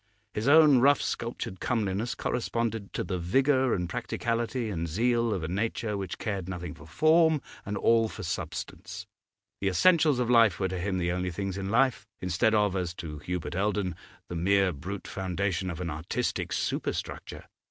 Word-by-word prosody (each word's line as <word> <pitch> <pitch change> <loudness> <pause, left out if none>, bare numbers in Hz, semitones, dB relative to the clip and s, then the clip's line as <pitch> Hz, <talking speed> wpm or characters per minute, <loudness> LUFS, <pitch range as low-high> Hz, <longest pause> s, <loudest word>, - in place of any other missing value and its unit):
His 105 +3 -2
own 150 -3 +7
rough 140 +3 +5
sculptured 115 -5 -4
comeliness 110 -1 -1
corresponded 115 -3 -2
to - - -1
the 90 -3 -3
vigour 130 +8 +2
and 90 -1 -2
practicality 115 +4 -2
and 85 -3 -2
zeal 115 +6 +1
of 95 -6 -2
a - - -2
nature 105 +3 -2
which 95 -3 -4
cared 100 -4 -3
nothing 90 -4 -5
for 80 -1 -14
form 160 - +4 0.3
and 105 0 -2
all 115 +1 +3
for - - -8
substance; - - -5 0.5
the 100 - -1
essentials 155 - +4
of 125 -1 0
life 115 -6 +5
were 95 -1 0
to 95 0 -3
him 95 +1 -1
the 85 -1 0
only 90 +1 -1
things 95 +2 -3
in 95 0 -4
life, 125 +4 +2
instead 90 +5 +2
of, 105 -2 +2
as 90 -3 -2
to 75 -4 -7
Hubert 90 +3 -4
Eldon, 100 -1 0 0.3
the 85 - -6
mere 95 +2 +3
brute 95 +8 -6
foundation 95 0 -2
of 85 -1 -5
an 85 -2 -3
artistic 80 +3 -2
super - - -1
structure. - - -6
100 Hz, 175 wpm, -28 LUFS, 90-115 Hz, 0.5 s, own